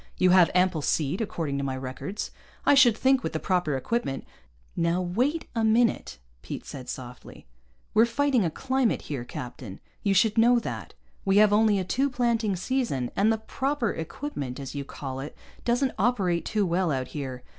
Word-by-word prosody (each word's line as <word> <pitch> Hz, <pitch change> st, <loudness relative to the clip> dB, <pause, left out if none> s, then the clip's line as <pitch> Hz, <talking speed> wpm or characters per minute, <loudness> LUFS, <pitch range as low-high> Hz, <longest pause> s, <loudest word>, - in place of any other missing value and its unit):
You 185 Hz, 0 st, +4 dB
have 180 Hz, -2 st, +6 dB
ample 180 Hz, -3 st, +3 dB
seed, 150 Hz, +6 st, 0 dB
according 160 Hz, -9 st, -2 dB
to -, -, -2 dB
my 135 Hz, -1 st, -2 dB
records. 130 Hz, +10 st, -5 dB, 0.3 s
I -, -, +6 dB
should 245 Hz, -5 st, +6 dB
think, 265 Hz, +1 st, +3 dB
with -, -, -4 dB
the 160 Hz, -, -1 dB
proper 175 Hz, -7 st, 0 dB
equipment 135 Hz, -, -2 dB, 0.3 s
" -, -, -34 dB
"Now 170 Hz, +1 st, +1 dB
wait 245 Hz, -, 0 dB
a 225 Hz, -1 st, 0 dB
minute," 225 Hz, -, +2 dB, 0.2 s
Pete -, -, -7 dB
said 130 Hz, -3 st, -8 dB
softly. 125 Hz, -1 st, -9 dB, 0.5 s
"We're 225 Hz, +2 st, +5 dB
fighting 265 Hz, -1 st, +2 dB
a 170 Hz, -, +1 dB
climate 260 Hz, +6 st, 0 dB
here, 135 Hz, -5 st, -4 dB
captain. 120 Hz, -4 st, -8 dB, 0.2 s
You 200 Hz, -1 st, +1 dB
should 215 Hz, +3 st, +3 dB
know 240 Hz, +2 st, +6 dB
that. 235 Hz, -, -5 dB, 0.3 s
We 195 Hz, 0 st, +2 dB
have 210 Hz, 0 st, +6 dB
only 210 Hz, -1 st, +4 dB
a 190 Hz, -, 0 dB
two 265 Hz, +9 st, 0 dB
planting 235 Hz, -5 st, 0 dB
season, 185 Hz, -, -1 dB
and 210 Hz, +3 st, +3 dB
the 225 Hz, -, +1 dB
'proper 260 Hz, +2 st, -1 dB
equipment,' 160 Hz, -, -5 dB
as 135 Hz, -1 st, -6 dB
you 140 Hz, -1 st, -3 dB
call 135 Hz, -1 st, -6 dB
it, 140 Hz, +3 st, -7 dB, 0.3 s
doesn't 245 Hz, +2 st, +1 dB
operate 190 Hz, -6 st, +1 dB
too 210 Hz, -2 st, 0 dB
well 175 Hz, -1 st, +1 dB
out 130 Hz, -2 st, -2 dB
here. 130 Hz, -4 st, -6 dB
190 Hz, 185 wpm, -26 LUFS, 140-235 Hz, 0.5 s, have